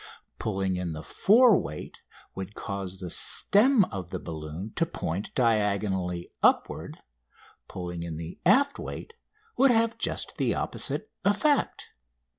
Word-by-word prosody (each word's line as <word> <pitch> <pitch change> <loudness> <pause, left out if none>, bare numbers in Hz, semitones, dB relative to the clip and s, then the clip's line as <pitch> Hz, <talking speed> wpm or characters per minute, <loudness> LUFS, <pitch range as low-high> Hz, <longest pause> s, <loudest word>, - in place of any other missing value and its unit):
Pulling 95 -3 -1
in 90 -3 -3
the 80 0 -7
fore 225 - +5
weight 75 - -5 0.3
would 95 +2 -7
cause 100 -2 -5
the 90 -3 -6
stem 220 0 +4
of 95 -4 -5
the - - -3
balloon 80 +5 -7
to 170 - +2
point 95 - -4
diagonally 100 -6 0
upward; - - +1 0.7
pulling 90 -1 -6
in 85 -2 -5
the 85 +1 -7
aft 275 +10 +4
weight 460 - -7 0.4
would 275 - +6
have 230 -1 +2
just - - -3
the - - +1
opposite - - -1
effect. 280 +8 +1
100 Hz, 130 wpm, -27 LUFS, -, 0.7 s, would